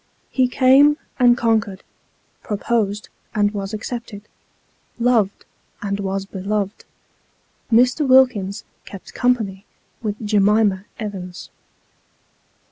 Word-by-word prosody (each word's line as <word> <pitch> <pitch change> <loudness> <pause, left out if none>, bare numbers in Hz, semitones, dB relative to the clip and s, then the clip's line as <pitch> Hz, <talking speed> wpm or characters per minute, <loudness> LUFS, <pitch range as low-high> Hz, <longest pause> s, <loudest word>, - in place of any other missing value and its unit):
He 255 -1 +2
came, 270 +4 +5 0.2
and 245 -1 +5
conquered 220 -5 0 0.6
pro 210 - -3
posed, 210 -2 -1 0.3
and 205 -1 +2
was 195 -1 -4
accepted 220 -1 -6 0.7
loved, 230 -5 +1 0.3
and 200 0 -3
was 195 0 -3
beloved. 200 +1 -3 0.9
ftlr. 250 +5 +3
Wilkins 225 -6 +3
" - - -41
kept 195 - -11
company 220 -6 0 0.2
" - - -42
with 210 -3 -2
Jemima 205 -1 +2
Evans. 190 -5 -7
210 Hz, 105 wpm, -20 LUFS, 200-245 Hz, 0.9 s, came